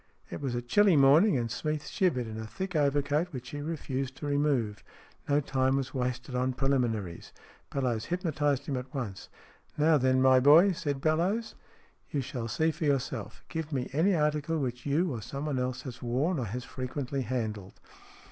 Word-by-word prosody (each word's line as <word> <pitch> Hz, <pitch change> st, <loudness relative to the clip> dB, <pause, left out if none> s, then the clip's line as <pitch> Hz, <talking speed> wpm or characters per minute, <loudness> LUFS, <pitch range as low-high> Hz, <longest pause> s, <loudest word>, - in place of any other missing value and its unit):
It -, -, -5 dB
was 130 Hz, -4 st, -2 dB
a 120 Hz, -, -2 dB
chilly 190 Hz, +9 st, +4 dB
morning, 145 Hz, +6 st, +6 dB
and 115 Hz, -2 st, -2 dB
Smeath 150 Hz, +3 st, -2 dB
shivered 150 Hz, -11 st, +1 dB
in 110 Hz, 0 st, -6 dB
a 110 Hz, -, -6 dB
thick 190 Hz, -, -5 dB
overcoat, 145 Hz, +2 st, +2 dB
which 125 Hz, -3 st, -7 dB
he 145 Hz, -, -5 dB
refused 135 Hz, -4 st, -3 dB
to -, -, -6 dB
remove. 140 Hz, -8 st, 0 dB, 0.5 s
No 145 Hz, +1 st, +4 dB
time 135 Hz, -2 st, +1 dB
was 135 Hz, -2 st, -2 dB
wasted 125 Hz, 0 st, -3 dB
on 130 Hz, +1 st, 0 dB
preliminaries. 120 Hz, -10 st, -1 dB, 0.4 s
Bellowes 125 Hz, -5 st, -1 dB
hypnotized 145 Hz, -6 st, 0 dB
him 140 Hz, -5 st, -2 dB
at 125 Hz, 0 st, -6 dB
once. 110 Hz, -8 st, -5 dB, 0.2 s
" -, -, -33 dB
Now 155 Hz, 0 st, +4 dB
then, 130 Hz, 0 st, +3 dB
my 130 Hz, 0 st, +6 dB
boy," 155 Hz, +9 st, +7 dB
said 145 Hz, -5 st, -3 dB
Bellowes. 180 Hz, +9 st, +1 dB, 0.3 s
" -, -, -35 dB
You 145 Hz, -4 st, 0 dB
shall 120 Hz, -2 st, -4 dB
see 160 Hz, +7 st, +1 dB
for 160 Hz, +1 st, -4 dB
yourself. 130 Hz, -6 st, -2 dB
Give 160 Hz, -2 st, -4 dB
me 130 Hz, -3 st, -2 dB
any 175 Hz, +7 st, +3 dB
article 150 Hz, +1 st, 0 dB
which 125 Hz, -3 st, -3 dB
you 160 Hz, +5 st, +1 dB
or 115 Hz, -, -5 dB
someone 140 Hz, +4 st, -3 dB
else 130 Hz, 0 st, -2 dB
has 125 Hz, -3 st, -8 dB
worn, 135 Hz, +8 st, 0 dB
or 125 Hz, -, -2 dB
has 120 Hz, +5 st, -4 dB
frequently 130 Hz, +1 st, -4 dB
handled." 110 Hz, -6 st, -4 dB
135 Hz, 185 wpm, -29 LUFS, 125-150 Hz, 0.5 s, boy